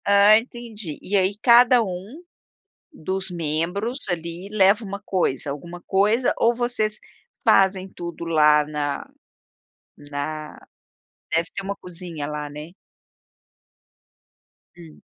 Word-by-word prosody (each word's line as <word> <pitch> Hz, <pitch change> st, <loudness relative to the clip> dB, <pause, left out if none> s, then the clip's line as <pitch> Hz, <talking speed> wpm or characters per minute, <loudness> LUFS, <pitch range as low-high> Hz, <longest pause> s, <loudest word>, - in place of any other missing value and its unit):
Ah, 200 Hz, +1 st, +7 dB
entendi, 225 Hz, -, -6 dB
e 200 Hz, -, -3 dB
aí 190 Hz, +1 st, +2 dB
cada 240 Hz, +1 st, +6 dB
um 200 Hz, -, -7 dB, 0.7 s
dos 190 Hz, -, -4 dB
membros 175 Hz, -, -2 dB
ali 170 Hz, +2 st, -4 dB
leva 205 Hz, +1 st, +4 dB
uma 200 Hz, -1 st, -6 dB
coisa, 145 Hz, -7 st, -1 dB
alguma 170 Hz, +5 st, -7 dB
coisa 210 Hz, +6 st, +2 dB
ou 235 Hz, -, +3 dB
vocês 235 Hz, -3 st, -1 dB, 0.4 s
fazem 190 Hz, -1 st, +4 dB
tudo 170 Hz, -2 st, -7 dB
lá 150 Hz, -2 st, +4 dB
na 145 Hz, -1 st, -3 dB, 0.9 s
na 145 Hz, +1 st, -6 dB, 0.8 s
deve 165 Hz, +1 st, +1 dB
ter -, -, -4 dB
uma 200 Hz, +1 st, -3 dB
cozinha 170 Hz, -4 st, -6 dB
lá, 150 Hz, 0 st, -5 dB
né? 150 Hz, +4 st, -9 dB, 2.0 s
Hum. 165 Hz, -3 st, -14 dB
185 Hz, 110 wpm, -23 LUFS, 155-210 Hz, 2.0 s, Ah